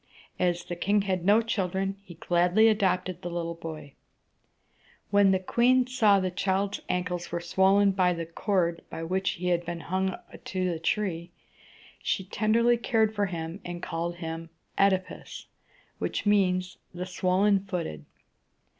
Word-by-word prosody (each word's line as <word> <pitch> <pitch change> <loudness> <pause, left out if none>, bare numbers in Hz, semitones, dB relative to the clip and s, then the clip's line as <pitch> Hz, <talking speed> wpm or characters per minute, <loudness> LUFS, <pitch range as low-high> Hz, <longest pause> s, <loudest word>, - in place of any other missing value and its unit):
As 175 -1 +1
the 175 - -5
king 200 +3 +1
had 185 -3 -1
no 210 +5 +5
children, 195 -3 -1
he 175 -3 -12
gladly 175 +6 +3
adopted 185 -4 +1
the 175 - -4
little 170 -1 -3
boy. 160 -4 -8 1.2
When 200 -1 +5
the 190 - +4
queen 245 +7 +3
saw 220 -6 +4
that 185 - 0
the - - -23
child's 195 +2 0
ankles 180 -1 -2
were 170 - -1
swollen 190 +3 +3
by 185 -2 +2
the 165 -1 -4
cord 170 0 -1
by 165 - -6
which 190 +3 0
he 180 0 -3
had 175 -1 +1
been 170 0 -5
hung 190 +2 -1 0.3
to 185 -1 -1
the 165 - -4
tree, 170 -1 -1 0.7
she 190 - -1
tenderly 225 +5 +2
cared 225 -2 +1
for 205 -1 0
him, 165 +1 -5
and 175 0 -7
called 170 +1 -3
him 165 -1 -6 0.3
OEd´i 190 -1 +3
pus, - - -10 0.5
which - - -2
means 185 -3 +2 0.2
"the 180 +1 -4
swollen 185 +2 +2
footed." 170 - -4
185 Hz, 155 wpm, -27 LUFS, 175-200 Hz, 1.2 s, no